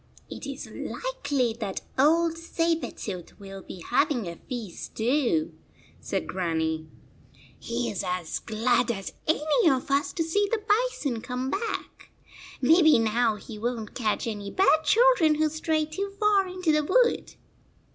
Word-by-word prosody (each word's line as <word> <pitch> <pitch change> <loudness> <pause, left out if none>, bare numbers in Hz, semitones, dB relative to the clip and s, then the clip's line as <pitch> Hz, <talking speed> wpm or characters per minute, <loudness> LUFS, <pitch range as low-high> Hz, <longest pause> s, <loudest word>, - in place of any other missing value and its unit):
"It - - -7
is - - -6
likely 290 - -2
that 200 -4 -3
old 325 +4 +3
Saber 330 0 -1
tooth 185 -2 -7
will 195 -1 -9
be 180 - -10
having 250 - +1
a 170 - -5
feast 230 -8 -7
too," 285 +6 +1 0.5
said - - -3
Grannie. 160 -3 -2 0.4
" - - -30 0.3
He 235 +1 -2
is 200 - -3
as 180 -3 -2
glad 230 +2 +1
as 195 -4 -3
any 315 +5 +3
of 265 +1 0
us 280 +1 +2
to 330 - 0
see 405 +6 +1
the 460 - +1
bison 415 - +1
come 255 +2 -3
back. 445 +4 -4 0.5
Maybe 315 +3 +6
now 225 0 +2
he 210 +1 -9
w 240 +3 -1
r - - -6
on 220 - -5
t - - -25
catch 220 -4 -1
any 205 -3 -4
bad 315 - +3
children 445 -8 +5
who 310 0 +2
stray 315 0 0
too 385 +6 -4
far 410 -2 +3
into 365 -3 0
the 305 0 +2
wood." 470 +10 +2
280 Hz, 160 wpm, -27 LUFS, 220-330 Hz, 0.5 s, Maybe